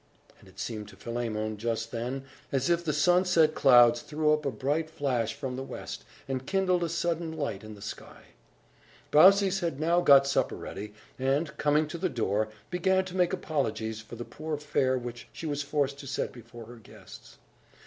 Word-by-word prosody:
And 95 Hz, -, -17 dB
it 95 Hz, -, -21 dB
seemed 105 Hz, -1 st, -5 dB
to -, -, -13 dB
Philemon, 110 Hz, -2 st, -3 dB
just 115 Hz, +1 st, -2 dB
then, 125 Hz, +3 st, -4 dB, 0.3 s
as 135 Hz, +5 st, +1 dB
if 170 Hz, 0 st, +2 dB
the 160 Hz, -, 0 dB
sunset 170 Hz, +1 st, +4 dB
clouds 120 Hz, -4 st, +6 dB
threw 150 Hz, 0 st, +1 dB
up 150 Hz, -1 st, -1 dB
a -, -, 0 dB
bright 145 Hz, +5 st, -1 dB
flash 125 Hz, -7 st, -1 dB
from 135 Hz, -3 st, -4 dB
the 130 Hz, -, -4 dB
west, 135 Hz, -, -7 dB, 0.2 s
and 130 Hz, -1 st, -4 dB
kindled 185 Hz, -2 st, +1 dB
a 170 Hz, -, -1 dB
sudden 170 Hz, 0 st, -1 dB
light 140 Hz, -10 st, -3 dB
in 110 Hz, 0 st, -9 dB
the 100 Hz, -, -12 dB
sky. 100 Hz, -, -9 dB, 0.9 s
Baucis 195 Hz, +4 st, +6 dB
had 165 Hz, -6 st, -2 dB
now 170 Hz, +3 st, +3 dB
got 140 Hz, -4 st, +7 dB
supper 140 Hz, -, 0 dB
ready, 105 Hz, +2 st, -8 dB, 0.2 s
and, 140 Hz, +4 st, 0 dB
coming 150 Hz, +1 st, +2 dB
to 165 Hz, +2 st, -6 dB
the 185 Hz, +1 st, 0 dB
door, 110 Hz, -, 0 dB, 0.2 s
began 190 Hz, +1 st, +2 dB
to 185 Hz, 0 st, -8 dB
make 180 Hz, -2 st, +2 dB
apologies 110 Hz, -, -2 dB
for 110 Hz, +2 st, -10 dB
the 120 Hz, +1 st, -6 dB
poor 155 Hz, 0 st, -5 dB
fare 135 Hz, -3 st, +1 dB
which 120 Hz, -1 st, -7 dB
she -, -, -8 dB
was 145 Hz, -2 st, -1 dB
forced 140 Hz, -1 st, -1 dB
to 140 Hz, -, -9 dB
set 135 Hz, -, -2 dB
before 120 Hz, -1 st, -12 dB
her 120 Hz, +2 st, -12 dB
guests. 115 Hz, -, -14 dB
140 Hz, 190 wpm, -28 LUFS, 120-160 Hz, 0.9 s, got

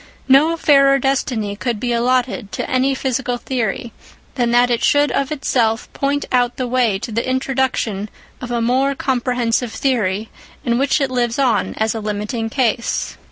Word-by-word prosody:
No 300 Hz, +5 st, +5 dB
fairer 275 Hz, -3 st, +5 dB
destiny 250 Hz, -6 st, -1 dB
could 235 Hz, 0 st, -3 dB
be 240 Hz, +1 st, -1 dB
allotted 245 Hz, -2 st, 0 dB
to -, -, -3 dB
any 260 Hz, +1 st, +1 dB
physical 260 Hz, -1 st, -2 dB
theory, 235 Hz, -2 st, -3 dB, 0.4 s
than 245 Hz, -3 st, 0 dB
that 245 Hz, +1 st, +3 dB
it 235 Hz, -, 0 dB
should 290 Hz, -2 st, +3 dB
of 275 Hz, +2 st, -1 dB
itself 235 Hz, -6 st, 0 dB
point 285 Hz, +1 st, -1 dB
out 245 Hz, -1 st, +1 dB
the 255 Hz, -, -1 dB
way 240 Hz, -5 st, +1 dB
to 215 Hz, -, -6 dB
the 230 Hz, +4 st, -2 dB
introduction 255 Hz, -6 st, -1 dB, 0.3 s
of 250 Hz, -, -6 dB
a 240 Hz, -1 st, -1 dB
more 260 Hz, +4 st, +1 dB
comprehensive 245 Hz, -3 st, 0 dB
theory, 220 Hz, -6 st, -1 dB, 0.3 s
in 235 Hz, 0 st, +1 dB
which 275 Hz, +2 st, +2 dB
it 270 Hz, -1 st, 0 dB
lives 240 Hz, -2 st, 0 dB
on 260 Hz, -4 st, +1 dB
as 220 Hz, 0 st, 0 dB
a 225 Hz, -, -4 dB
limiting 210 Hz, +2 st, -3 dB
case. 235 Hz, -2 st, -1 dB
245 Hz, 165 wpm, -19 LUFS, 230-265 Hz, 0.4 s, No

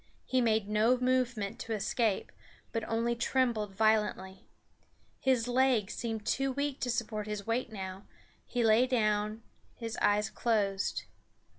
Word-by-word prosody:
He 260 Hz, -1 st, +1 dB
made 220 Hz, -3 st, +2 dB
no 215 Hz, +4 st, +3 dB
movement 250 Hz, -5 st, 0 dB
to 225 Hz, -, -4 dB
escape, 215 Hz, 0 st, 0 dB, 0.4 s
but 225 Hz, -2 st, -2 dB
only 230 Hz, +1 st, +1 dB
trembled 235 Hz, -4 st, 0 dB
violently. 210 Hz, -3 st, +1 dB, 0.7 s
His 255 Hz, -3 st, +2 dB
legs 245 Hz, -4 st, +2 dB
seemed 225 Hz, -3 st, -4 dB
too 270 Hz, +3 st, +1 dB
weak 280 Hz, +1 st, -2 dB
to 250 Hz, -, -2 dB
support 220 Hz, -3 st, -2 dB
his 210 Hz, -1 st, -4 dB
weight 235 Hz, +1 st, -1 dB
now; 190 Hz, -1 st, -7 dB, 0.4 s
he 245 Hz, -1 st, 0 dB
lay 225 Hz, +3 st, +5 dB
down; 215 Hz, -2 st, 0 dB, 0.3 s
his 230 Hz, -1 st, -5 dB
eyes 210 Hz, +1 st, +2 dB
closed. 200 Hz, -4 st, 0 dB
225 Hz, 135 wpm, -31 LUFS, 210-245 Hz, 0.7 s, lay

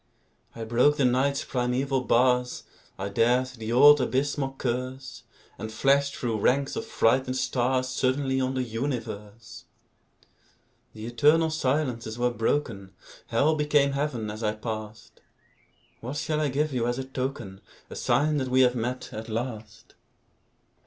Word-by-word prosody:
I 115 Hz, -, -6 dB
broke 125 Hz, +6 st, +3 dB
the 140 Hz, -, +2 dB
Night's 130 Hz, +3 st, +1 dB
primeval 130 Hz, +2 st, -1 dB
bars, 125 Hz, 0 st, +2 dB, 0.3 s
I 95 Hz, -, -3 dB
dared 120 Hz, +5 st, +2 dB
the 115 Hz, -3 st, -7 dB
old 145 Hz, +4 st, +7 dB
abysmal 135 Hz, +1 st, -1 dB
curse, 130 Hz, +2 st, -4 dB, 0.4 s
And 110 Hz, -, -5 dB
flashed 140 Hz, +5 st, +2 dB
through 115 Hz, -3 st, -2 dB
ranks 135 Hz, +6 st, +1 dB
of 225 Hz, -, -4 dB
frightened 130 Hz, -, +1 dB
stars 130 Hz, 0 st, 0 dB
Suddenly 130 Hz, +1 st, 0 dB
on 130 Hz, +1 st, -1 dB
the 130 Hz, -, 0 dB
universe! 115 Hz, -3 st, -6 dB, 1.3 s
The 110 Hz, 0 st, -8 dB
eternal 150 Hz, +7 st, +3 dB
silences 130 Hz, -6 st, -1 dB
were 125 Hz, 0 st, +1 dB
broken; 115 Hz, -6 st, -2 dB, 0.3 s
Hell 140 Hz, +7 st, +2 dB
became 150 Hz, -2 st, +2 dB
Heaven 135 Hz, -7 st, -2 dB
as 110 Hz, +2 st, -8 dB
I 105 Hz, -1 st, -1 dB
passed. 110 Hz, -1 st, -7 dB, 0.8 s
What 130 Hz, +5 st, -6 dB
shall 155 Hz, 0 st, -1 dB
I 150 Hz, -, +1 dB
give 145 Hz, +2 st, -1 dB
you 120 Hz, -2 st, 0 dB
as 120 Hz, 0 st, -1 dB
a 135 Hz, -, -3 dB
token, 130 Hz, -7 st, -5 dB, 0.3 s
A -, -, -7 dB
sign 150 Hz, +1 st, +1 dB
that 130 Hz, -2 st, -1 dB
we 130 Hz, +1 st, +3 dB
have 125 Hz, -1 st, +4 dB
met, 125 Hz, +2 st, -3 dB
at 110 Hz, +1 st, -7 dB
last? 110 Hz, -2 st, -6 dB
130 Hz, 145 wpm, -26 LUFS, 115-140 Hz, 1.3 s, old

